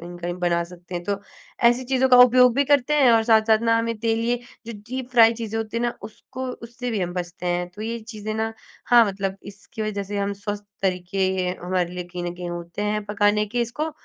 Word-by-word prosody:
कहीं-कहीं 175 0 -6
बना 170 -1 +1
सकते 180 +1 -11
हैं। 175 - -3
तो 200 -1 -2 0.5
ऐसी 245 +2 0
चीज़ों 265 0 +2
का 250 - +7
उपयोग 250 -1 +5
भी 280 - +2
करते 285 +1 +3
हैं 275 -5 +5
और 225 -1 +4
साथ-साथ 220 0 +5
ना, 230 0 +3
हमें 230 0 -1
तेल 225 0 0
ये 245 +1 +1 0.3
जो 230 - -5 0.2
डीप 260 -1 -4
फ्राय 230 -2 +6
चीज़ें 225 0 -4
होती 225 0 -4
हैं 235 - 0
ना, 240 - -1
उसको 255 +4 -8 0.2
उससे 245 +1 -5
भी 215 - -1
हम 175 -1 -2
बचते 180 0 -5
हैं। 175 0 -2
तो 210 - -7
ये 230 +1 -3
चीज़ें 215 0 -5
ना 220 0 -2 0.3
हाँ, 240 -1 +7
मतलब 195 -1 -3 0.2
इसकी 210 +2 -9
वजह 210 -2 -2
से 205 - -1
हम 200 0 -1
स्वस्थ 205 -1 -4 0.2
तरीके 185 0 -2 0.4
हमारे 180 -1 -1
लिए 180 -1 -4
कहीं 175 0 -6
न 175 0 -4
कहीं 175 0 -6
होते 175 +3 -6
हैं 210 -1 -2
पकाने 205 0 +1
के 240 - +2
इसको 305 +6 -3
215 Hz, 225 wpm, -23 LUFS, 180-235 Hz, 0.5 s, का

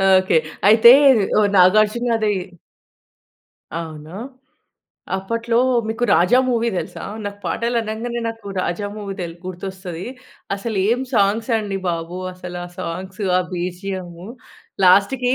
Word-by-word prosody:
Okay. 185 -3 +3 0.3
అయితే, 225 +2 +8 0.5
ఓహ్! 205 -1 +3
నాగార్జునాది 215 +3 +3 1.4
అవునా? 160 -1 -8 1.1
అప్పట్లో 230 +4 -2 0.3
మీకు 225 +2 -1
'రాజా' 180 +9 +5
మూవీ 235 -1 +1
తెలుసా? - - -6 0.2
నాకు 205 0 -6
పాటలు 235 +1 -1
అనంగానే, 230 +2 -4
నాకు 225 -3 -8
'రాజా' 185 +3 -2
మూవీ 200 -2 -6
తెల్ 170 -2 -5
గుర్తొస్తది. 185 -1 -6 0.5
అసలు 215 +2 -4
ఏం 240 +3 +2
సాంగ్స్ 215 +3 +2
అండి 200 -2 -3
బాబు! 170 +1 -3 0.2
అసలు 180 -1 -8
ఆ - - -7
సాంగ్స్, 185 +4 -6 0.2
ఆ - - +2
బిజిఎము, 180 0 -5 0.6
లాస్ట్‌కి 220 +8 +4
200 Hz, 115 wpm, -20 LUFS, 180-225 Hz, 1.4 s, అయితే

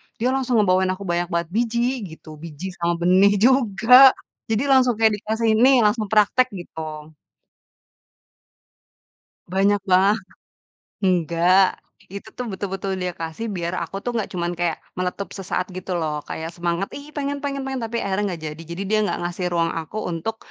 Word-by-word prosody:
dia 245 +3 0
langsung 260 -2 0
ngebawain 190 -3 +3
aku 200 - -9
banyak 175 -1 -1
banget 170 -2 -2
biji 235 +4 0 0.2
gitu 160 - -16
biji 170 +3 -7
sama 170 0 +1
benih 185 +4 +4
juga, 250 +2 +6 0.3
jadi 225 +2 0
langsung 255 -3 +4
kayak 220 0 +3
dikasih, 220 +2 0
"Nih 255 0 +6
langsung 210 0 +1
praktek," 215 +5 +3
gitu. 175 -3 -9 2.7
Banyak 200 +2 +2
banget. 195 +2 +3 0.8
Nggak, 175 0 +3 0.5
itu 200 +2 -8
tuh 250 - -6
betul-betul 195 -1 -4
dia 180 -1 -2
kasih 165 +7 -5
biar 170 -1 -3
aku 170 +3 -6
tuh 245 - -1
nggak 220 - -2
cuman 175 -1 -2
kayak 175 -2 -1 0.2
meletup 185 +2 -3
sesaat 185 -1 -2
gitu 185 0 -5
loh 150 -2 -2
kaya 160 - -5
semangat, 175 +2 -2
"Ih, 285 +1 -9
pengen 285 -1 -3
pengen 275 -1 -2
pengen." 265 -1 -3
Tapi 225 +1 -4
akhirnya 200 +1 -1
nggak 165 -2 -7
jadi 155 +2 -11
jadi 170 +3 -4
dia 215 +1 +2
nggak - - -2
ngasih 175 +1 -3
ruang 165 -1 +1
aku 160 +6 -10
untuk, 175 +7 -4
195 Hz, 160 wpm, -22 LUFS, 175-230 Hz, 2.7 s, juga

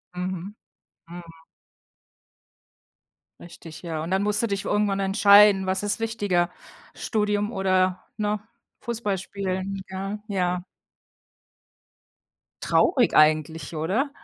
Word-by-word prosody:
Mhm, 185 +2 -5 0.5
mhm. 175 +1 -9 2.2
Richtig, 165 -2 -12
ja. 160 -2 -4
Und 170 - -5
dann 190 +1 +2
musst 210 +2 0
du - - +2
dich 200 -2 -3
irgendwann 205 -1 0
entscheiden, 200 0 +6
was 190 +1 -1
ist 205 +2 -1
wichtiger: 205 -6 0 0.4
Studium 210 0 -1
oder, 185 -1 +1
ne, 210 -1 -1 0.4
Fußballspielen, 195 -3 -3
ja. 195 +2 -5
Ja. 180 -3 -1 2.0
Traurig 260 -9 +3
eigentlich, 155 +2 +2
oder? 195 - 0
195 Hz, 95 wpm, -24 LUFS, 180-210 Hz, 2.2 s, entscheiden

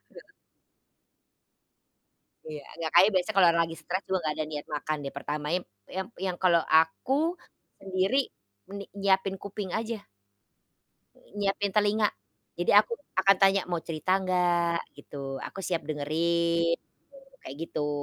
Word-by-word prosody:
Heeh. - - -12 2.2
Iya, 155 -2 -7 0.2
nggak, 160 -1 -2
kayaknya 185 +5 +7
biasa 185 +2 +1
kalau 195 -3 +6
orang 170 0 +3
lagi 165 0 -7
stres 185 +4 -3
juga 190 0 0
nggak 155 -1 -1
ada 155 - -1
niat 145 -1 -5
makan 155 +1 -2
deh 140 - -5
pertamanya 150 +4 -2
ep - - -43 0.3
yang 190 0 -2 0.2
yang 180 -2 -2
kalau 170 -2 +5
aku, 265 - +3 0.5
sendiri, 195 +8 +1 0.5
ni 200 - -6
nyiapin 195 0 +2
kuping 200 -1 -5
aja. 225 +1 -2 1.4
Nyiapin 200 0 0
telinga. 210 0 +3 0.5
Jadi 175 - +1
aku 210 +3 +5 0.2
akan 195 +1 +6
tanya, 195 0 +5
"Mau 175 -2 -1
cerita 170 +4 0
nggak?" 175 -2 +2 0.2
Gitu, 140 -1 -6
"Aku - - -9
siap 170 -5 -2
dengerin." 170 +3 +1
Gitu, 270 -1 -22
kayak 130 - -7
gitu. 150 -1 -2
180 Hz, 140 wpm, -28 LUFS, 160-195 Hz, 2.2 s, kayaknya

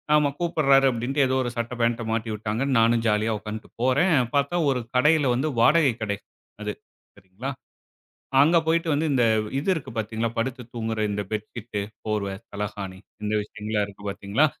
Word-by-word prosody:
ஆமா 150 -1 +4
கூப்ட்றாரே 140 -6 +4
அப்டின்னு 130 +4 0
ஏதோ 130 - 0
ஒரு 120 - -2
சட்ட 115 +1 -3
பாண்ட்‌ட 115 0 +1
மாட்டி 115 0 -1
விட்டாங்கன்னு 110 +6 -1
நானும் 115 +1 +4
ஜாலியா 110 +1 +2
உட்கார்ந்துட்டு 105 +1 -7
போறேன். 145 +8 +3 0.2
பார்த்தா 140 +4 +1
ஒரு 130 -2 +1 0.2
கடையில 145 +1 +4
வந்து 140 +5 0
வாடகை 145 +1 +5
கடை 100 -2 -1 0.4
அது 105 - -2 0.4
சரிங்களா! 100 +7 -7 0.9
அங்க 160 +5 +5
போய்ட்டு 165 +1 +2
வந்து 155 +3 +1
இந்த 125 -3 +3 0.3
இது 145 - -3
இருக்கு 135 -5 -6
பார்த்தீங்களா, 110 +1 -1
படுத்து 125 +2 -2
தூங்குற 110 -1 -2
இந்த 105 0 -1
பெட்ஷீட்டு, 110 0 -4 0.3
போர்வை, 100 -2 -1 0.2
தலகாணி 100 -2 -5 0.3
இந்த 105 - 0
விஷயங்கள்லாம் 105 0 -2
இருக்கு 100 0 -14
பார்த்தீங்களா! 100 +9 +2
115 Hz, 155 wpm, -25 LUFS, 105-140 Hz, 0.9 s, வாடகை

